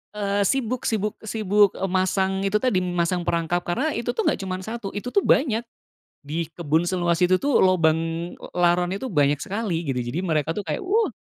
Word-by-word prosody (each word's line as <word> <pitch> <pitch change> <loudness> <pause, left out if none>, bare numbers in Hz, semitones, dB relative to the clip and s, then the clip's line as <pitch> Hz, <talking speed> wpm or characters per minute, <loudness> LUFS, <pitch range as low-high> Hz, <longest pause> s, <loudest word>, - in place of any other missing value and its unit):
eee 200 -1 0
sibuk 255 0 -1
sibuk 210 -2 -1
sibuk, 205 -2 +2
eee, 195 - -2
masang 190 +1 +1
itu 195 - -1
tadi 245 -8 +2
masang 175 -1 -1
perangkap, 170 +1 +1
karena 260 - 0
itu 240 -2 -3
tuh - - 0
nggak - - +1
cuma 190 -1 -3
satu, 225 0 -5
itu 205 +4 -4
tuh 400 - +2
banyak. 240 -5 +3 0.6
Di 160 +3 -3
kebun 165 +1 +1
seluas 175 -2 0
itu 180 +1 +4
tuh, 280 +6 +2
lubang, 165 -4 +4 0.4
eee, - - -12
laronnya 175 +1 +2
itu 260 +5 -5
banyak 145 -3 +3
sekali, 190 -2 -3
gitu. 130 -3 -1
Jadi, 120 +7 -3
mereka 155 -3 0
tuh 205 - -3
kayak 155 - -3
wuh. 430 +4 +1
185 Hz, 190 wpm, -24 LUFS, 170-215 Hz, 0.6 s, itu